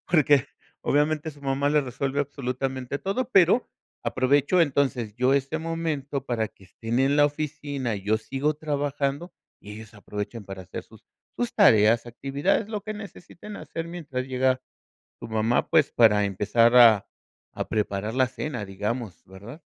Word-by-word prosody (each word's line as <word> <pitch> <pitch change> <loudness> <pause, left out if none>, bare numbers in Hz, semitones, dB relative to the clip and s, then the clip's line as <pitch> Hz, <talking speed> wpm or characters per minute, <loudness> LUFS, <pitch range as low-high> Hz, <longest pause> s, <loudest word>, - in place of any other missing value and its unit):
porque 145 -5 +4 0.3
obviamente 150 +2 0
su 145 0 -18
mamá 140 +1 0
les 150 -1 +3
resuelve 135 +2 -2
absolutamente 130 -1 -3
todo. 230 +6 -2
Pero, 195 +6 +4 0.4
aprovecho 145 +7 +2
entonces 130 -7 0
yo 130 +2 +3
este 140 +3 0
momento 155 -4 -3
para 115 -4 -1
que 100 - -21
estén 115 +6 -3
en 140 +2 +3
la 145 - +6
oficina 145 -5 -3
y 95 - -8
yo 110 +2 +2
sigo 135 +6 -2
trabajando 145 +2 -2 0.3
y 105 - -10
ellos 110 +1 -11
aprovechan 105 +2 -6
para 95 -1 -8
hacer 90 - -8
sus - - -18 0.3
sus 240 -1 -2
tareas, 115 - +5
actividades, 140 - -1
lo 210 -2 -3
que 215 - -5
necesiten 205 -1 -10
hacer 165 0 -6
mientras 145 -7 -5
llega 130 0 +1 0.6
su - - -8
mamá, 110 +2 0
pues 160 -4 +3
para 105 -3 +4
empezar 105 +5 +2
a 115 -5 +7 0.5
a - - -4
preparar 105 +1 -2
la 130 - +4
cena, 125 -4 -5
digamos, 105 +1 -4
¿verdad? 100 - -12
135 Hz, 155 wpm, -25 LUFS, 115-150 Hz, 0.6 s, a